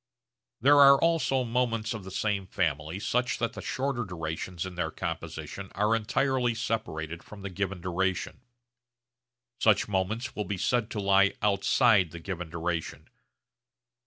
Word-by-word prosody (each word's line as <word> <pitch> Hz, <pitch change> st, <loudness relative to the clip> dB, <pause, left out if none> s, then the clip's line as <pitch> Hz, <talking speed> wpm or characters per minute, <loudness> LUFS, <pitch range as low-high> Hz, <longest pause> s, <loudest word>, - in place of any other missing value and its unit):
There 145 Hz, +3 st, +6 dB
are 140 Hz, -1 st, +8 dB
also 165 Hz, -6 st, +2 dB
moments 115 Hz, -2 st, 0 dB
of 110 Hz, -3 st, -6 dB
the 95 Hz, -, -8 dB
same 100 Hz, 0 st, -1 dB
family 80 Hz, -2 st, -1 dB
such 125 Hz, +4 st, 0 dB
that 115 Hz, -1 st, -1 dB
the -, -, -7 dB
shorter 130 Hz, -2 st, -2 dB
durations 85 Hz, -1 st, -4 dB
in 95 Hz, -, -6 dB
their 85 Hz, -2 st, -2 dB
composition 95 Hz, +4 st, -6 dB
are 105 Hz, +3 st, +2 dB
entirely 125 Hz, +1 st, +1 dB
separated 85 Hz, -8 st, -3 dB
from 100 Hz, -2 st, -12 dB
the 100 Hz, -, -5 dB
given 95 Hz, -1 st, -3 dB
duration. 95 Hz, +5 st, -2 dB, 1.2 s
Such 110 Hz, -2 st, +3 dB
moments 105 Hz, +5 st, -2 dB
will 105 Hz, -, -2 dB
be 100 Hz, -, -3 dB
said 120 Hz, +4 st, 0 dB
to 105 Hz, -, -4 dB
lie 100 Hz, 0 st, +4 dB
'outside' 105 Hz, -1 st, +4 dB
the 85 Hz, +2 st, -9 dB
given 90 Hz, -1 st, -5 dB
duration. 85 Hz, 0 st, -4 dB
100 Hz, 145 wpm, -28 LUFS, 90-120 Hz, 1.2 s, are